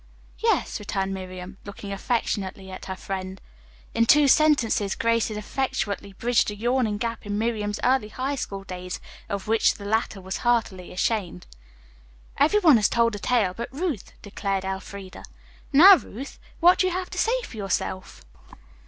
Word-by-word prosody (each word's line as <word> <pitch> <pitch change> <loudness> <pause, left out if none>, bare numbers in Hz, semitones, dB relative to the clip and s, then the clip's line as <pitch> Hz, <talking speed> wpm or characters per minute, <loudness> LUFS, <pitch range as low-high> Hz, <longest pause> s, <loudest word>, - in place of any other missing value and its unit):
"Yes," - - +1
returned 195 -2 -2
Miriam, 185 0 -8
looking 200 0 -8
affectionately 195 -3 -2
at 185 - -8
her 190 - -4
friend. 190 0 -5 0.5
In 230 0 +2
two 295 +2 +6
sentences 255 -9 +3
Grace 230 0 +1
had 215 - -5
effectually 210 -4 -3
bridged 235 +3 +1
a 210 - -5
yawning 235 -1 0
gap 230 +1 -3
in 205 0 -3
Miriam's 210 -2 -1
early 255 -3 +2
high 260 +6 -3
school 200 -7 -5
days 180 -1 -6 0.3
of 200 -1 -4
which 225 0 +3
the 200 - -10
latter 220 -1 0
was 190 +1 -5
heartily 225 -7 0
ashamed. 185 - -2 0.9
"Every 320 +9 +4
one 315 - +7
has 210 - +3
told 235 -1 +2
a 205 - -5
tale 210 -4 +1
but 235 - -5
Ruth," 290 - -3
declared 195 -2 -3
Elfreda. 190 0 -6 0.5
"Now, 360 +7 +9
Ruth, 265 0 -9 0.2
what 355 +2 +6
have 370 -1 +2
you 365 +1 -2
to - - -10
say - - +2
for 230 - -9
yourself?" 190 -1 -3
210 Hz, 160 wpm, -25 LUFS, 195-245 Hz, 0.9 s, Now